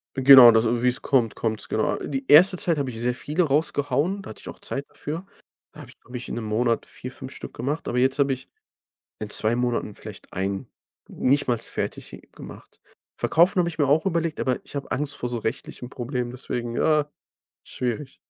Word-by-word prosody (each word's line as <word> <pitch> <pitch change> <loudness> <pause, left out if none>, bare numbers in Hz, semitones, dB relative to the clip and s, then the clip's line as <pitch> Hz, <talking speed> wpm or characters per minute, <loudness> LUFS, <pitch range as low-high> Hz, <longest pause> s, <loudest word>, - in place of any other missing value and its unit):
Genau, 130 -2 +10
das 115 0 +3
und 120 +1 0
wie 125 - +5
es 125 - -1
kommt, 125 -6 +1
kommt 110 -2 -2
es, - - -10
genau. 110 - +1
A - - -4
die 135 -1 -4
erste 180 +5 +7
Zeit 170 -2 0
habe 140 -2 -1
ich 115 -2 -7
sehr 125 +1 0
viele 150 +7 -1
rausgehauen, 150 +4 0
da - - -9
hatte - - -13
ich - - -9
auch - - -10
Zeit 140 - -4
dafür. 160 +5 -6 0.5
Da - - -15
habe - - -11
ich, - - -16
glaube 125 +1 -8
ich, 120 - -8
in - - -5
'nem 120 - -4
Monat 115 +2 0
4, 125 - -9
5 130 0 -9
Stück - - -9
gemacht, 145 +4 -3
aber 120 - -2
jetzt 130 +2 +2
habe 140 -1 +3
ich 130 +1 -9 0.7
in 105 -1 -5
2 110 +2 +1
Monaten 120 -3 -1
vielleicht - - -12
1 95 +1 -3 0.4
nichtmals 125 -4 0
fertig - - -6
gemacht. - - -13 0.4
Verkaufen 175 +3 +3
habe 170 - +1
ich 160 - -8
mir 145 - +3
auch 150 +4 +3
überlegt, 170 -4 -1
aber 130 -2 0
ich - - -14
habe 140 - -5
Angst 145 +2 -2
vor 125 - -4
so 120 -1 -3
rechtlichen 115 +2 -5
Problemen, 125 -1 -4
deswegen 120 -2 -5
ja, 150 0 +2 0.5
schwierig. 130 +3 -4
130 Hz, 215 wpm, -24 LUFS, 120-150 Hz, 0.7 s, Genau